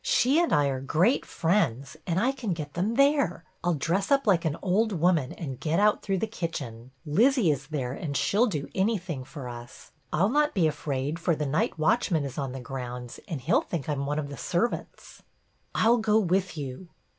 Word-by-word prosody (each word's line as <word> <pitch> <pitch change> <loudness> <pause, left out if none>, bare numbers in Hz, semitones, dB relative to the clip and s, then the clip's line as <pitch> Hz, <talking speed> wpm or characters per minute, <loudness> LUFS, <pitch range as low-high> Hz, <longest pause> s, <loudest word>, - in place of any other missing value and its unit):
She 320 - +3
and 345 - 0
I 145 - +4
are 130 -1 -3
great 175 - +2
friends, 160 - 0
and 170 0 +1
I 245 +6 +2
can 250 -8 -3
get 150 -3 -6
them 200 +6 -1
there. 275 - +3 0.2
I - - -2
'll 175 - +2
dress 175 +7 0
up 275 -1 +3
like 180 -5 +3
an 155 -1 0
old 210 +4 +2
woman 165 -5 +2
and 135 -6 -6
get 160 +2 0
out 210 0 +3
through 195 -1 -1
the 205 - 0
kitchen. 140 - -5 0.2
Lizzie 220 - +4
is 135 -1 -3
there, 135 -5 -3
and 140 -1 -3
she 160 - 0
'll 235 +4 +5
do 150 -9 -3
anything 190 - -1
for 135 -1 -8
us. 120 0 -10 0.2
I 155 - +2
'll 195 - +4
not 295 +4 +2
be 180 -5 +3
afraid, 145 0 -2
for 170 -1 +1
the 150 - -2
night 150 +3 0
watchman 160 -2 +2
is 135 +1 -5
on 135 -2 -2
the 135 - -6
grounds 125 -1 -6
and 160 -9 -4
he - - 0
'll - - +5
think 165 -6 -5
I - - 0
'm 140 -1 -3
one 145 +1 -1
of 145 -2 -3
the 140 - -7
servants." 185 +8 -3 0.3
" - - -41
I - - +3
'll 240 +1 +6
go 220 -1 +3
with 185 -2 0
you." 140 +5 -6
165 Hz, 225 wpm, -27 LUFS, 140-205 Hz, 0.3 s, ll